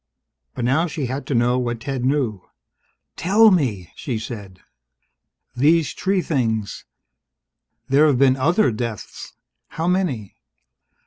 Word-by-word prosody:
But 120 - -2
now 145 +8 +2
she 150 -4 -4
had 130 +3 -5
to 140 - -1
know 120 +2 +2
what 120 -2 -3
Ted 135 -2 -3
knew. 130 -7 0 0.7
"Tell 205 +7 +5
me!" 115 - 0
she 125 -5 -4
said. 105 -5 -8 1.0
"These 155 +4 +3
tree 190 -2 0
things 110 - -2 0.5
" 115 +1 -56
"There've 140 0 +4
been 130 0 +4
other 160 - +2
deaths! 115 -1 -6 0.3
How 165 +1 -4
many?" 170 - -1
130 Hz, 125 wpm, -21 LUFS, 115-155 Hz, 1.0 s, Tell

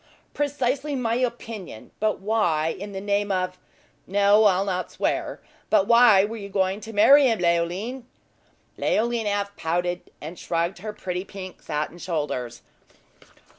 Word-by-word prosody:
"Precisely 285 0 -1
my 235 -3 -1
opinion; 230 - -4
but 215 0 0
why, 185 -7 +1
in 200 +5 -6
the 195 - -5
name 205 0 0
of 185 -1 -2 0.5
no, 205 +2 +4
I'll 195 -1 +3
not 185 -2 -2
swear; - - -2 0.3
but 190 - +4
why 235 -4 +6
were 225 +2 -6
you 200 -2 -8
going 190 +1 0
to 225 - -8
marry 270 +7 +6
him, 225 -2 +2
Leoline?" 180 +9 -1 0.7
Leoline 230 0 0
half 200 0 -1
pouted, 175 +2 -2
and 160 +4 -8
shrugged 170 +1 -2
her 215 +3 -5
pretty 180 -3 -4
pink 190 -2 -9
satin 150 +3 -4
shoulders. 130 -9 -3
200 Hz, 140 wpm, -24 LUFS, 180-225 Hz, 0.7 s, why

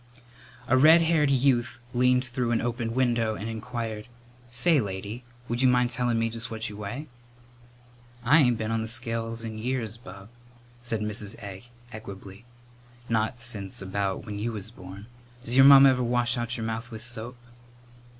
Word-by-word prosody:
A 130 -1 +4
red 160 +4 +7
haired 160 -3 +2
youth 125 -3 +1
leaned 125 +1 +3
through 120 -1 -2
an 120 - +1
open 120 -1 -3
window 120 -4 +1
and 105 - -6
inquired, 115 -1 -5 0.4
"Say, 130 +5 +4
lady, 100 +4 -6 0.2
would 120 +1 -1
you 130 - +5
mind 125 -1 +3
tellin' 120 -1 +1
me 115 0 +1
just 115 +1 -5
what 110 0 -4
you 105 - -9
weigh?" 105 +8 -6 1.2
"I 145 +7 +5
ain't 125 -5 +3
been 110 0 -3
on 115 0 0
the 110 - -4
scales 115 -1 -2
in 110 -1 -6
years, 115 -2 -3
bub," 100 -2 -12 0.5
said 115 -3 -3
Mrs. 105 0 -4
Egg 100 0 -9 0.3
equably; 100 0 -10 0.6
"not 110 +1 0
since 105 -5 -5
about 95 +1 -3
when 105 -2 -6
you 115 +3 -2
was 105 0 -7
born. 95 -1 -11 0.4
Does 120 0 -2
your 135 0 +8
mamma 140 0 +9
ever 125 -1 0
wash 120 0 +1
out 120 0 -3
your 115 - -4
mouth 115 +1 -4
with 110 -2 -7
soap?" 120 +1 -5
115 Hz, 170 wpm, -26 LUFS, 110-125 Hz, 1.2 s, mamma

